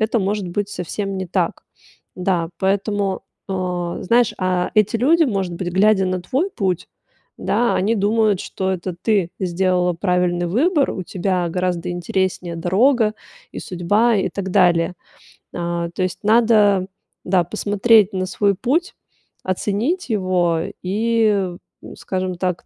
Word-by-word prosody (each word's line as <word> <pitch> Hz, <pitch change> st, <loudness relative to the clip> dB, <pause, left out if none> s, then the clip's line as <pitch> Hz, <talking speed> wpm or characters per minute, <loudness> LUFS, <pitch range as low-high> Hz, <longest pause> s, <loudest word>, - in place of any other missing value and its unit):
это, 220 Hz, +2 st, +1 dB
может 200 Hz, -1 st, -1 dB
быть, 205 Hz, +3 st, -2 dB
совсем 195 Hz, +2 st, -4 dB
не 190 Hz, -, -3 dB
так. 175 Hz, -, -1 dB, 0.5 s
Да, 180 Hz, -3 st, 0 dB
поэтому, 200 Hz, 0 st, 0 dB, 0.3 s
э, -, -, -3 dB, 0.5 s
знаешь, 235 Hz, +4 st, +2 dB
а 185 Hz, -1 st, 0 dB
эти 215 Hz, +1 st, +3 dB
люди, 320 Hz, +8 st, +4 dB
может 195 Hz, -8 st, -2 dB
быть, 175 Hz, +1 st, -4 dB
глядя 195 Hz, +1 st, +3 dB
на 185 Hz, -1 st, -1 dB
твой 275 Hz, -, -1 dB
путь, 185 Hz, -, -2 dB, 0.5 s
да, 240 Hz, 0 st, +1 dB
они 215 Hz, +5 st, +1 dB
думают, 210 Hz, -1 st, +2 dB
что 190 Hz, 0 st, -3 dB
это 180 Hz, -1 st, -4 dB
ты 200 Hz, -6 st, +1 dB
сделала 180 Hz, -1 st, +1 dB
правильный 180 Hz, -1 st, 0 dB
выбор, 285 Hz, -, +2 dB
у 185 Hz, -, -4 dB
тебя 180 Hz, -1 st, -1 dB
гораздо 180 Hz, 0 st, -2 dB
интереснее 175 Hz, 0 st, -2 dB
дорога, 215 Hz, +6 st, +2 dB, 0.4 s
и -, -, -6 dB
судьба, 205 Hz, +6 st, +1 dB
и 190 Hz, -, 0 dB
так 190 Hz, +1 st, -5 dB
далее. 180 Hz, -2 st, +3 dB, 0.6 s
А, 170 Hz, -1 st, -2 dB
то 185 Hz, -, -2 dB
есть 180 Hz, -1 st, -3 dB
надо, 210 Hz, -4 st, +4 dB, 0.4 s
да, 180 Hz, -1 st, +3 dB
посмотреть 210 Hz, +2 st, +3 dB
на 185 Hz, -1 st, -1 dB
свой 200 Hz, +1 st, +1 dB
путь, 315 Hz, -, 0 dB, 0.5 s
оценить 220 Hz, -, -1 dB
его 180 Hz, -5 st, +1 dB, 0.2 s
и, 225 Hz, +4 st, +1 dB, 0.6 s
м, -, -, -10 dB
скажем 185 Hz, -1 st, -3 dB
так, 180 Hz, 0 st, -3 dB
190 Hz, 140 wpm, -20 LUFS, 180-215 Hz, 0.6 s, люди